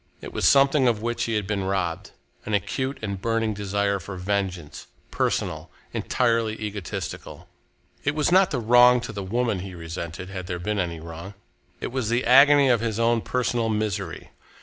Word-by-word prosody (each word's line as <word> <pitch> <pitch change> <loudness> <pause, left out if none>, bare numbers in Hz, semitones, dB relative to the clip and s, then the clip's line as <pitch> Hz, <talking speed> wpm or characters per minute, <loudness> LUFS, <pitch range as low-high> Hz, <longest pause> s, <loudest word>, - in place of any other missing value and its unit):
It - - -9
was - - +2
something 140 -1 +5
of 110 -2 0
which 120 0 -1
he 115 - -1
had 105 -2 -1
been 100 -1 -2
robbed, 95 -1 -2 0.3
an 105 - -1
acute 130 +7 -2
and 100 -2 -4
burning 115 -1 0
desire 100 0 -1
for 95 +2 -8
vengeance, 90 -4 -3 0.2
personal, - - -1 0.2
entirely 115 -3 0
egotistical. 105 -5 -6 0.6
It 145 +1 0
was 150 +2 +1
not 185 0 +5
the 140 - -2
wrong 120 +2 +6
to 120 - -6
the 100 -2 -5
woman 115 +2 -1
which 90 - -6
he 95 - -9
resented, 85 +2 -6
had 95 -2 -6
there 90 -2 -3
been 105 +4 -2
any 85 -3 -2
wrong. 85 +4 -9 0.4
It - - -4
was 125 -4 -2
the 120 +2 0
agony 140 +3 +7
of 120 -4 +3
his 115 -2 -2
own 115 0 +2
personal 120 -2 -1
misery. 105 -5 -3
105 Hz, 180 wpm, -24 LUFS, 95-120 Hz, 0.6 s, agony